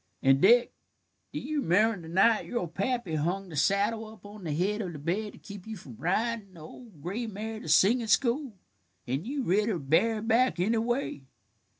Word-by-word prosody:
"And, 135 0 +4
Dick, 240 +5 +5 0.6
do - - -4
you 300 +1 -2
remember 205 +2 +2
the - - -9
night 215 +5 +3
your 240 -8 -2
pappy 200 +2 -2
hung 180 +5 -1
the 160 - -8
saddle 205 +7 +1
up 220 -1 -14
on 205 -2 -11
the 155 - -2
head 195 +8 0
of 180 -4 -5
the - - -7
bed 185 +8 -2
to - - -14
keep 200 -1 -11
you 220 -1 -6
from 130 -9 -12
ridin' 210 +1 -1
the - - -12
old 165 - -13
gray 220 +7 -3
mare 220 +1 -5
to 160 - -8
singin' 225 +9 +4
school, 240 0 +1 0.5
and 135 - -3
you 275 0 -2
rid 210 +2 +2
her, 200 - 0
bareback, 220 - +2
anyway? 230 - 0
210 Hz, 190 wpm, -28 LUFS, 175-230 Hz, 0.6 s, Dick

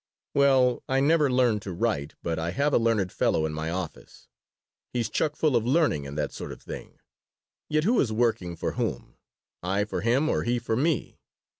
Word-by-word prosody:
"Well, 130 -3 +4
I 135 0 +2
never 150 +1 +3
learned 125 -4 +2
to 95 - -6
write, 85 -7 -1
but 80 -1 -1
I 80 +1 -2
have 140 +9 0
a - - +5
learned 110 -5 +1
fellow 80 - +1
in 80 - -3
my 80 +1 -3
office. 85 -2 -6 0.6
He's 120 -2 -1
chuck 150 -1 0
full 155 -5 +2
of 115 - +3
learning 125 - +2
and 70 +2 -7
that 75 -2 -1
sort - - -6
of - - -9
thing. - - -9 0.7
Yet 155 0 +2
who 230 +7 +3
is 115 - 0
working 110 -6 0
for - - -2
whom - - -4 0.4
I 95 +3 0
for 105 - -3
him 125 +7 +2
or - - +1
he 120 +1 0
for 120 -1 -2
me? 145 +2 0
115 Hz, 195 wpm, -27 LUFS, 90-140 Hz, 0.7 s, a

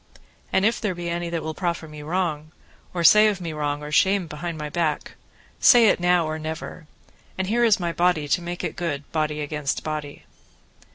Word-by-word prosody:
And 190 - +2
if 230 +2 +1
there 205 -5 -1
be 170 0 -4
any 170 0 -3
that 170 -1 -3
will 160 - -4
proffer 170 -1 -3
me 150 -1 -10
wrong, 155 -2 -2 0.4
or 175 -2 -2
say 210 +5 +7
of 205 -3 0
me 170 -3 -5
wrong 145 -1 -2
or 150 - -7
shame 190 +4 +3
behind 160 +1 -6
my 150 -1 -4
back, 155 0 -2 0.5
say 235 -4 +7
it - - +2
now 175 -1 +3
or 155 0 -3
never, 160 +1 -7 0.5
and 190 - -1
here 235 +5 +1
is 225 -4 +4
my 170 -2 -2
body 170 -4 +1
to 175 +5 +1
make 175 +1 -5
it - - -3
good, 150 -5 -3
body 150 -1 -1
against 150 -1 -3
body. 150 -2 -5
170 Hz, 205 wpm, -24 LUFS, 150-180 Hz, 0.5 s, say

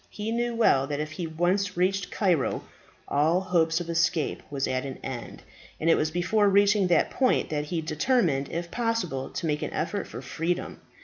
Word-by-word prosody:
He 215 +1 -4
knew 240 0 -1
well 135 - +3
that 145 0 -3
if 150 0 -3
he 170 +1 -4
once 180 +4 0
reached 185 +1 +1
Cairo 180 -9 +1 0.4
all 155 +5 +2
hope 170 -3 +1
of 175 - -5
escape 165 -2 0
was 140 -2 -1
at 130 0 -1
an 135 -1 -6
end; 125 -3 -6 0.4
and 165 +1 +3
it - - +6
was 155 - +1
before 185 +5 +2
reaching 200 0 +4
that 170 -3 +3
point 260 -1 +2
that 150 -1 -1
he 165 +2 -2
determined 155 - +1
if 170 +1 -4
possible 230 - -1
to - - -4
make 150 -2 0
an - - -4
effort 195 +6 -2
for - - -8
freedom. 170 +2 -3
170 Hz, 190 wpm, -27 LUFS, 155-195 Hz, 0.4 s, it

